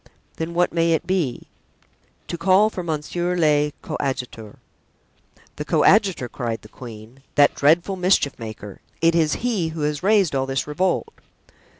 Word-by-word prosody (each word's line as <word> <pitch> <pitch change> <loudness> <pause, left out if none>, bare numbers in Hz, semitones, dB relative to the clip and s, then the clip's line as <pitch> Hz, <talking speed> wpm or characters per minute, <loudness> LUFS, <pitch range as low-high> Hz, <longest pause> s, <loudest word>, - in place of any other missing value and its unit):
"Then 165 +1 -4
what 175 -1 +2
may 165 -1 +2
it 160 - -1
be?" 170 -10 -1 0.9
"To - - -2
call 195 +5 +3
for 185 - -5
monsieur 175 +2 -2
le 150 -3 +2
coadjuteur." 125 -7 -4 1.0
"The - - -3
coadjutor!" 195 - +3
cried 115 -2 -4
the 105 - -14
queen, 115 +2 -12
"that 145 0 +5
dreadful 170 +6 +2
mischief 180 -7 +1
maker! 110 -3 -9 0.2
It 165 0 +3
is 160 -3 +2
he 210 -9 0
who 160 -1 -6
has 150 0 -1
raised 200 -4 +3
all 135 -1 0
this 135 0 -1
revolt." 180 - -1
160 Hz, 150 wpm, -22 LUFS, 135-180 Hz, 1.0 s, that